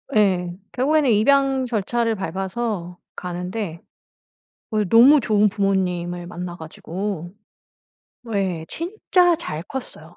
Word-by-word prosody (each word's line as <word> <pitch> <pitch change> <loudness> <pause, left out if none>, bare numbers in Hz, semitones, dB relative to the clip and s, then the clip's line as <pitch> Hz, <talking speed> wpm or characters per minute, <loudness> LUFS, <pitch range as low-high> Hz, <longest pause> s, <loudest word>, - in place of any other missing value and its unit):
예. 180 -4 +2 0.2
결국에는 285 +1 +2
입양 270 +4 +3
절차를 230 0 0
밟아서 190 0 -3 0.2
가는데 180 0 -5 0.9
어 215 -1 +1
너무 240 - +7
좋은 210 -1 +3
부모님을 180 -3 -1
만나 175 0 -6
가지고 175 +2 -5 1.0
예 185 -5 -1
진짜 355 0 +2
잘 160 - -5
컸어요. 175 -9 -8
195 Hz, 220 characters per minute, -22 LUFS, 175-240 Hz, 1.0 s, 너무